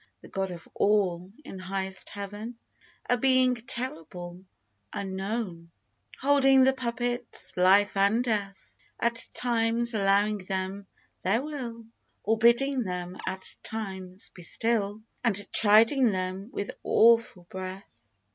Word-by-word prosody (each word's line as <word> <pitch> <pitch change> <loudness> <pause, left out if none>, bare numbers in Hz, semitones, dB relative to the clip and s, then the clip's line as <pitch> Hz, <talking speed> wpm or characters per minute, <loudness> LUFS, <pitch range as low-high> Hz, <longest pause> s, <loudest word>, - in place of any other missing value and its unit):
The - - -13
God 195 -1 -2
of 170 -2 -9
All, 190 -3 +1
in 190 - -8
highest 190 0 -3
Heaven, 205 +4 -7 0.5
A 245 - +2
Being 255 0 +4
terrible 180 -7 -3 0.3
— 100 -1 -47
^unknown 190 -2 -4 0.3
— - - -21
Holding 270 -1 +5
the 265 +1 +4
puppets, 245 -1 0
Life 195 +3 +4
and 200 +5 +3
Death, 200 -6 -3 0.2
At 235 0 0
times 235 0 +1
allowing 205 0 +2
them 190 +1 -4 0.3
their 220 +7 +1
will, 245 -7 -6 0.4
Or 220 +2 +1
bidding 250 +4 +4
them, 180 -3 -4
at 190 0 -5
times, 190 -4 -5
be 180 - -12
still, 215 +2 -1 0.2
And 205 -4 0
chiding 225 +4 +5
them, 185 +2 -4
with 200 - -4
awful 230 -5 +4
breath 185 - -9
205 Hz, 125 wpm, -27 LUFS, 190-235 Hz, 0.5 s, Holding